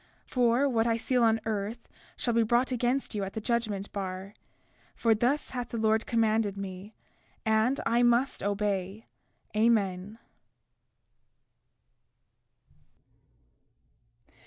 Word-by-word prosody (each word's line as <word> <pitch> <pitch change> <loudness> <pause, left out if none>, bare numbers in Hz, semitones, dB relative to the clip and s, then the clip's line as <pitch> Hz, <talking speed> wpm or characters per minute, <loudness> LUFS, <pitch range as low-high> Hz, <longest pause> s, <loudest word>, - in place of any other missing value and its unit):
33:15 - - -30
For 245 +2 +3
what 230 -3 +1
I 230 -1 +2
seal 250 +2 0
on 225 -1 +4
earth, 220 +2 -3 0.3
shall 240 - 0
be 230 - +3
brought 240 +3 +2
against 250 +2 0
you 205 -2 -2
at 195 - -5
the - - -3
judgment 215 -3 -2
bar; 190 0 -5 0.6
for 230 -1 +3
thus 245 +7 0
hath 245 -2 -4
the 235 - -4
Lord 220 0 +1
commanded 220 -3 +1
me, 195 +2 -7 0.5
and 220 +5 +2
I 235 +1 +2
must 240 +2 +2
obey. 200 0 -2 0.5
Amen. 210 -2 +1
225 Hz, 115 wpm, -29 LUFS, 205-240 Hz, 0.6 s, on